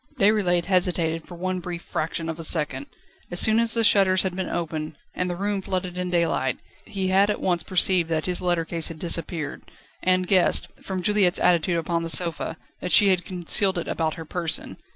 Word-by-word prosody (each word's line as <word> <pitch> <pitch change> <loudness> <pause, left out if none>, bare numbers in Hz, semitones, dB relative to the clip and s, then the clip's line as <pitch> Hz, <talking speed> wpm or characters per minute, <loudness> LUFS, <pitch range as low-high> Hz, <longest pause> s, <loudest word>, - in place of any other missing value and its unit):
Déroulède 195 -4 +2
hesitated 175 -3 0
for 175 - -10
one 185 +1 -3
brief 175 -1 -6
fraction 165 +1 -4
of 165 0 -5
a - - -6
second. 160 - 0 0.4
As 175 - +2
soon 220 +1 +5
as 230 0 0
the 230 - +1
shutters 190 -3 +4
had 185 -2 -3
been 190 -1 -3
opened, 155 -2 -4 0.2
and 180 0 -2
the 175 - -3
room 200 +1 -2
flooded 185 -1 -3
in 180 0 -3
daylight, 165 -7 0 0.3
he 190 -2 -3
had 195 +2 +3
at 210 - -1
once 175 -2 0
perceived 180 -2 +2
that 160 -1 -1
his 180 -1 -2
letter 175 -2 0
case 165 -1 +2
had 165 - -7
disappeared, 165 -2 -3 0.4
and 185 0 +2
guessed, 185 -2 +3
from 185 -2 -5
Juliette's 200 -2 +3
attitude 170 0 +2
upon 170 +1 -1
the 165 - -4
sofa, 165 -1 -1 0.2
that 180 - -4
she 205 -2 +8
had 185 -2 +2
concealed 185 +1 -1
it 170 - -4
about 160 -2 -2
her 165 - -8
person. 170 0 -3
180 Hz, 200 wpm, -24 LUFS, 165-185 Hz, 0.4 s, she